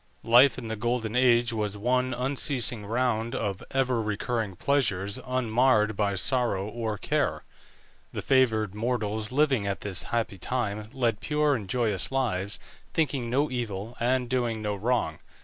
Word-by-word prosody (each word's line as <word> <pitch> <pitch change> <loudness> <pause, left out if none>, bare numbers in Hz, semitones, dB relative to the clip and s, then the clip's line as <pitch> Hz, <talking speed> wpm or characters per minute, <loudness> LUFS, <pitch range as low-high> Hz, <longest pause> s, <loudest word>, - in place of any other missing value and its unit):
Life 125 +4 +6
in 120 -3 -6
the 110 - -3
Golden 115 0 -2
Age 120 -2 +4
was 105 -2 -2
one 125 +4 +1
unceasing 125 -4 0
round 115 0 0
of 100 -3 -2
ever 130 -3 +1
recurring 110 -1 -2
pleasures 100 -5 0
unmarred 120 -3 +2
by 100 -1 0
sorrow 110 -2 +1
or 110 -1 -3
care. - - -1 0.7
The - - -5
favoured 110 -7 +2
mortals 110 -1 -2
living 135 -6 +2
at 100 - -3
this 95 -5 -1
happy 115 -5 -2
time 110 -2 -2
led 120 -5 0
pure 150 -1 +1
and 105 -8 -4
joyous 105 -6 0
lives, 105 -7 -1 0.4
thinking 140 -7 0
no 140 +4 +1
evil, 115 -2 -4
and 125 +1 +1
doing 120 -3 -1
no 105 -1 -2
wrong. 120 +5 -1
115 Hz, 150 wpm, -27 LUFS, 105-125 Hz, 0.7 s, Life